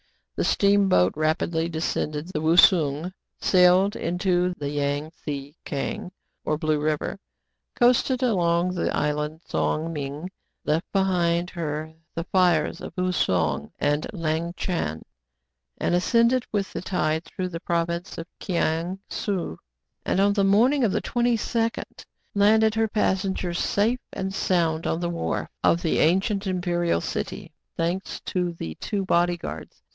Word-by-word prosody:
The - - 0
steamboat 200 - +3
rapidly 160 +2 0
descended 160 -1 -2
the 155 -5 -3
Wousung, 160 0 +4 0.3
sailed 185 +2 +4
into 180 0 0
the 145 -1 -3
Yang 145 +1 -1
Tse 145 -2 -6
Kiang, 145 +5 -4 0.3
or 155 - 0
Blue 155 -2 0
River, 155 +5 -1 0.6
coasted 250 +1 +3
along 180 -5 +2
the 175 - -1
island 150 +2 -1
Tsong 160 +2 -1
Ming, 145 +4 -5 0.3
left 155 +3 0
behind 180 -3 +1
her 155 -2 -4 0.2
the 165 - -2
fires 175 -4 +2
of - - -7
Ou 185 0 +1
Song 80 - 0
and 145 +1 0
Lang 165 -2 -2
Chan, 80 - -2 0.7
and - - 0
ascended 235 +7 +3
with 200 -2 -2
the - - -3
tide 160 -3 0
through 185 +1 -5
the 165 -2 -5
province 170 +1 -2
of 165 - -5
Kiang 170 0 -1
Sou, 180 - -3 0.4
and, - - 0
on 200 +1 +4
the 200 -1 +2
morning 240 +8 +4
of 220 - +3
the - - -1
22d, 235 -1 0 0.5
landed 215 +2 +4
her 225 0 +1
passengers 190 -4 0
safe 225 +5 +1
and 190 0 -4
sound 170 -4 +1
on 165 - 0
the 175 0 -1
wharf 170 - -2
of 170 - +3
the 165 - +1
ancient 195 +5 +2
imperial 175 - 0
city. - - -5 0.2
Thanks 175 +3 -2
to 180 -2 -2
the 80 - -6
two 200 -2 -2
body 175 -1 +2
guards. - - -8
175 Hz, 140 wpm, -25 LUFS, 155-195 Hz, 0.7 s, Wousung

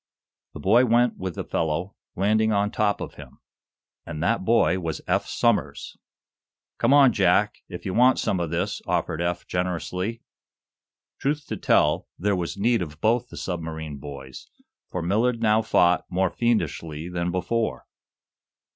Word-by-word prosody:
The - - -6
boy 115 +6 +4
went 120 0 +3
with 95 -3 -4
the - - -4
fellow, 85 +4 -2 0.2
landing 110 +3 +2
on 105 0 +1
top 105 -1 0
of - - -6
him. - - -13 0.7
And 75 +1 -5
that 115 +2 +1
boy 110 -3 +3
was 80 -3 -3
Eph - - +1
Somers! - - 0 0.8
"Come 115 - +3
on, 140 -4 +6
Jack, - - +2
if - - -8
you 95 - -2
want 125 +4 +5
some 95 - 0
of 85 -2 -2
this!" 85 +1 -2
offered 80 - -1
Eph, 85 0 -2
generously. 90 +4 -3 1.0
Truth 145 +1 -1
to - - -2
tell, - - +2
there 100 +2 +1
was 90 +1 -3
need 115 +2 +2
of 75 -3 -6
both 115 +4 +1
the - - -10
submarine 80 -4 -5
boys, 65 -2 -9 0.4
for 90 - -4
Millard 115 +7 +1
now 110 -1 +3
fought 90 -5 +3
more 95 0 +1
fiendishly 85 -9 -1
than 90 0 -2
before. 110 +6 -2
95 Hz, 155 wpm, -25 LUFS, 85-115 Hz, 1.0 s, on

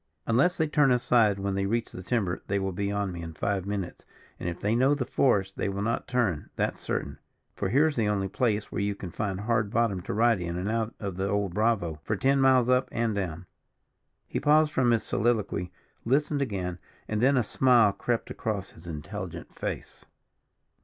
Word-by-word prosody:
"Unless 135 +11 +3
they 160 - +2
turn 150 -2 +3
aside 120 -4 +3
when 100 0 -2
they 100 0 0
reach 115 +2 -1
the 90 - -8
timber, 95 -3 -1
they 100 - 0
will 95 -1 -1
be 100 +2 -2
on 100 -2 -1
me 85 -1 -6
in 80 -1 -7
five 100 +2 -1
minutes; 100 -3 -4 0.4
and 85 - -2
if 85 - -6
they 105 +2 0
know 130 +5 +4
the 135 -3 -2
forest, 100 -9 +1
they - - -1
will 100 +1 -3
not 115 +2 -1
turn, 115 - 0
that's - - -1
certain; - - -3 0.3
for 95 - -2
here's 145 +6 +3
the 110 -3 +2
only 100 -2 0
place 105 -1 -1
where - - -2
you 100 0 -1
can 95 -3 -7
find 100 -1 -3
hard 110 -1 +1
bottom 115 -4 +1
to - - -5
ride 115 -3 +3
in 85 0 -3
and 95 +4 -2
out 115 0 -1
of 100 -3 -4
the 95 +1 -1
old 100 -3 0
Bravo, 100 -7 +1
for 110 - -1
ten 135 +6 +2
miles 130 -2 +5
up 125 0 +2
and 115 -1 0
down." 90 -3 -3 0.8
He - - -2
paused 155 +1 +4
from 130 -4 +2
his 115 -2 +2
soliloquy, 105 -5 0 0.3
listened 145 +4 +1
again, 90 -8 -3 0.3
and 110 0 -1
then 135 +2 +4
a 125 - +3
smile 120 -2 +4
crept 115 +3 -2
across 100 -3 -3
his 85 +2 -14
intelligent 75 -3 -6
face. - - -6
105 Hz, 205 wpm, -28 LUFS, 95-120 Hz, 0.8 s, miles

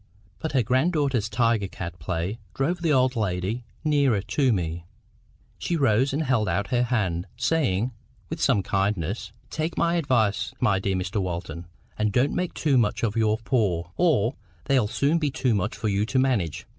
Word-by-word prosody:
But 160 - -4
her 130 -3 +3
grand 130 - +2
daughter's 135 -8 0
tiger 115 -2 +1
cat 85 -2 -7
play 85 +8 -3 0.2
drove 170 +6 0
the 165 -2 +1
old 130 -2 +3
lady 105 +2 -2 0.2
nearer 140 -9 +2
to 135 +2 +1
me. 85 -4 -2 0.8
She 170 - -1
rose 130 -1 +3
and 145 +4 0
held 120 -8 +1
out 100 +1 -1
her 120 -1 +3
hand, 95 -9 0
saying, 125 - +1 0.4
with - - -5
some 100 - +3
kindness— 95 0 -1 0.2
"Take 160 +1 -3
my 170 +1 +2
advice, 115 -6 +1
my 100 -6 +2
dear 95 0 -1
Mr 95 +2 -1
Walton, 85 -2 -5 0.3
and 105 -1 +1
don't 125 +6 +2
make 180 -1 -2
too 140 -5 +2
much 110 -1 0
of 105 -3 0
your 110 -1 +2
poor, 105 -8 0
or 140 - +2 0.3
they'll 130 -6 +3
soon 145 +9 +1
be 150 -3 0
too 130 -2 0
much 100 0 -1
for 110 - -2
you 100 0 +1
to 130 - -1
manage. 120 - +1
115 Hz, 180 wpm, -25 LUFS, 100-135 Hz, 0.8 s, her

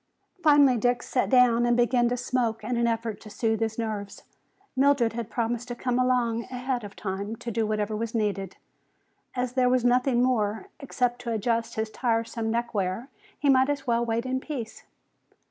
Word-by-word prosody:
Finally 290 -5 +5
Dick 245 +2 +1
sat 250 - 0
down 250 -2 +5
and 240 0 +2
began 240 0 +3
to 245 - -1
smoke 240 -3 -1
in 245 +3 -2
an 235 0 +2
effort 225 -2 -2
to 215 - -11
soothe 220 +1 -1
his 225 -1 -2
nerves. 215 -3 -4 0.5
Mildred 270 -4 +3
had 235 -1 -5
promised 235 +1 -2
to 240 - -5
come 250 0 -1
along 245 -2 +1
ahead 250 -1 -3
of 205 -1 -9
time 200 +2 -4
to 235 +1 -6
do 225 0 0
whatever 215 0 -1
was 230 +1 -3
needed. 200 -4 -2 0.8
As 250 -1 -2
there 255 -1 +3
was 250 -1 +2
nothing 250 0 +3
more, 220 -4 0
except 250 -3 -1
to 235 - -4
adjust 230 +1 -1
his 220 0 -2
tiresome 230 -1 -1
neckwear, 230 -1 -2 0.3
he 290 - -1
might 265 0 +5
as 285 -1 -2
well 235 -1 +1
wait 230 +1 -1
in 260 0 -1
peace. 260 -6 -7
235 Hz, 180 wpm, -26 LUFS, 225-250 Hz, 0.8 s, Finally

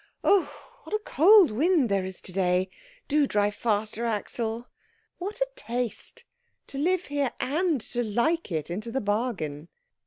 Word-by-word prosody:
"Oh, 400 -2 +4 0.3
what - - -3
a 425 - -2
cold 375 - +6
wind 300 +4 +3
there 200 -2 +1
is 185 0 -6
to 185 - -8
day. 185 0 +1 0.4
Do 295 -1 +3
drive 205 -2 +1
faster, 215 +1 -1
Axel. 230 +1 -2 0.5
What 400 +5 -4
a - - +3
taste, 245 - -4 0.4
to 275 - -6
live 360 +4 +1
here 285 -3 -1
and 315 +2 +1
to 240 +2 -2
like 240 - 0
it 160 0 -2
into 215 +6 -4
the 265 - 0
bargain!" 205 - -2
235 Hz, 155 wpm, -27 LUFS, 205-315 Hz, 0.5 s, cold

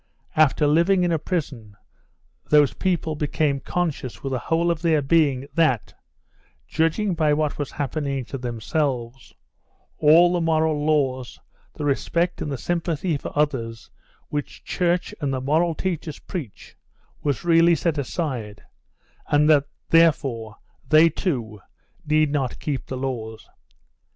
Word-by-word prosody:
After 155 -1 +4
living 170 +5 +3
in 175 - +1
a 165 - +1
prison 135 - -4 0.7
those 150 -2 +5
people 175 -4 -1
became 145 -1 0
conscious 155 -7 -3
with 135 - -3
the 130 - -1
whole 165 +7 +1
of 165 -2 -3
their 165 -3 +3
being 140 -2 +2
that, 155 -8 +1 0.7
judging 165 +5 0
by 155 -3 +2
what 150 -1 -1
was 145 - -2
happening 140 -2 -3
to 135 - -6
themselves, 125 +1 -3 0.6
all 165 +4 +6
the 175 - 0
moral 160 -2 +1
laws, 135 -5 0 0.4
the 150 - -4
respect 170 +5 0
and 150 - -3
the 135 - -2
sympathy 170 +1 -1
for 140 - -5
others 115 -7 -1 0.4
which 145 -1 -5
church 175 +2 -1
and 140 -2 -1
the 130 - -1
moral 160 +5 +1
teachers 170 -4 -3
preach, 150 - -8 0.5
was 145 +2 -2
really 170 0 +5
set 160 -2 -1
aside, 125 -8 -4 0.6
and 150 +1 +3
that, 145 -2 +4 0.3
therefore, 135 -10 +2 0.3
they, 155 +2 +7
too, 120 - -3 0.5
need 155 -1 +3
not 135 -4 -1
keep 140 -3 -4
the 130 - -5
laws. 115 -4 -5
150 Hz, 135 wpm, -23 LUFS, 135-165 Hz, 0.7 s, they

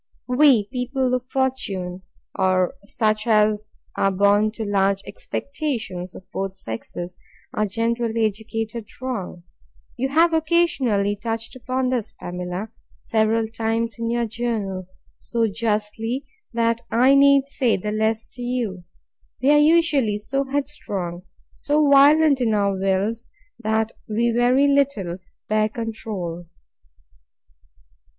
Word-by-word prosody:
We 255 -3 +5
people 255 0 -1
of 250 0 -1
fortune, 195 -10 -2 0.3
or 185 -1 +2
such 215 0 0
as 215 -1 +2 0.2
are 195 - +2
born 205 +2 +3
to 220 -1 -4
large 195 -1 +1
expectations, 220 - -4
of 185 - -11
both 195 0 -3
sexes, 175 +8 -6 0.3
are 215 -3 0
generally 230 +1 0
educated 220 +1 -4
wrong. 230 -9 -5 0.5
You 265 +2 -1
have 330 +4 +4
occasionally 290 -11 +2
touched 225 +2 -4
upon 255 +1 -1
this, 245 -4 -2
Pamela, 180 +4 -5 0.3
several 220 0 +1
times 225 +1 -2
in 230 0 -1
your 235 0 +1
journal, 215 -5 -3 0.3
so 230 -1 -1
justly, 220 +4 -2 0.3
that 230 -1 +1
I 255 +4 +5
need 275 0 +6
say 260 -4 +1
the 210 +3 -3
less 220 +1 0
to 245 - -11
you. 240 -7 -2 0.6
We 265 +5 +3
are 295 - +6
usually 295 -8 +3
so 275 +6 -2
headstrong, 235 -11 -3 0.3
so 295 0 +1
violent 285 0 +6
in 225 -3 +2
our 200 -1 +2
wills, 195 +5 -1 0.3
that 220 0 0 0.2
we 235 +2 +1
very 245 +4 +4
little 270 -11 +1 0.3
bear 215 0 +2
control. 210 -7 -5
225 Hz, 120 wpm, -23 LUFS, 205-255 Hz, 0.6 s, need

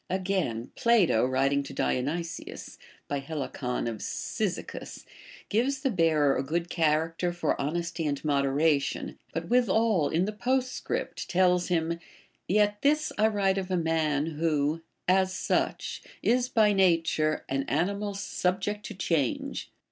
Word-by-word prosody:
Again, 185 - -1
Ph\to 195 - +4
writing 135 +2 +2
to 140 - -8
Dionysius, 165 +7 -3 0.3
by 145 -1 -2
llehcon 135 -4 -3
of 115 -2 -3
Cyzicus, - - -4 0.4
gives 265 +5 0
the 270 -2 +1
bearer 155 -6 +3
a - - 0
good 170 +5 -2
character 165 +2 +1
for 175 -4 -1
honesty 165 +2 -2
and 140 0 -3
moderation, 140 0 +1
but 165 +1 -4
withal 225 -8 +3
in 170 +3 +1
the 210 - -2
postscript 255 +4 -2
tells 180 -1 +3
him, 170 -1 0 0.5
Yet 205 +1 +2
this 300 +2 +2
I 215 - +5
Avrite 195 -3 +1
of 190 -1 -5
a 185 - +1
man, 160 -2 0
Avho, 155 -1 +1 0.3
as 190 +1 +3
such, - - -1 0.2
is 250 +1 +2
by 215 -4 +4
nature 165 -5 +2
an 135 0 0
animal 200 +6 -1
subject 200 +1 -1
to 210 - -8
change. 165 -8 -1
170 Hz, 135 wpm, -28 LUFS, 150-200 Hz, 0.5 s, I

